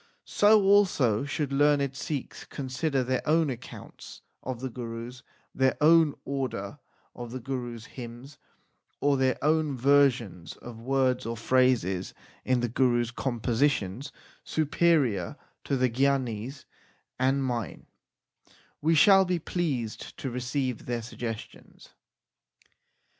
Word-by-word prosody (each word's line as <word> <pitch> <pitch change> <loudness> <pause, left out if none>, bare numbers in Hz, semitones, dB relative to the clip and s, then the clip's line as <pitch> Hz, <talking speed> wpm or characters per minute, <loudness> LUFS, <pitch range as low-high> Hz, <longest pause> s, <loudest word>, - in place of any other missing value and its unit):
So 210 0 +4
also 180 - +3
should 145 -1 -2
learned 140 -1 +2
Sikhs 140 -1 -5
con 135 -3 -6
sider 135 0 0
their 130 0 -1
own 155 -1 +2
accounts 125 0 -10 0.2
of 130 -2 -5
the 130 +1 -4
Gurus, 120 +1 -7 0.3
their 130 0 +2
own 160 -1 +5
order 130 -8 -4 0.3
of 120 -1 -8
the 130 - -5
Gurus 120 -3 -5
hymns, 125 +3 -10 0.6
or 145 0 +2
their 130 -1 +1
own 155 -2 +1
versions 125 -10 +2
of 120 -2 -10
words 130 0 0
or 115 0 -3
phrases 115 -7 +1 0.3
in 130 -1 +1
the 120 - 0
Gurus 120 -1 +1
compositions 120 -2 -1 0.3
superior 150 - +1 0.3
to 140 - 0
the 130 0 +3
gyanis 130 -1 -1 0.5
and 135 +1 +2
mine, 120 -6 -3 1.0
we 165 +2 +3
shall 195 +5 +7
be 180 -1 0
pleased 145 -10 -3
to 135 - -4
receive 125 0 -3
their 120 -1 -2
suggestions. 115 -1 -8
130 Hz, 120 wpm, -28 LUFS, 120-145 Hz, 1.0 s, shall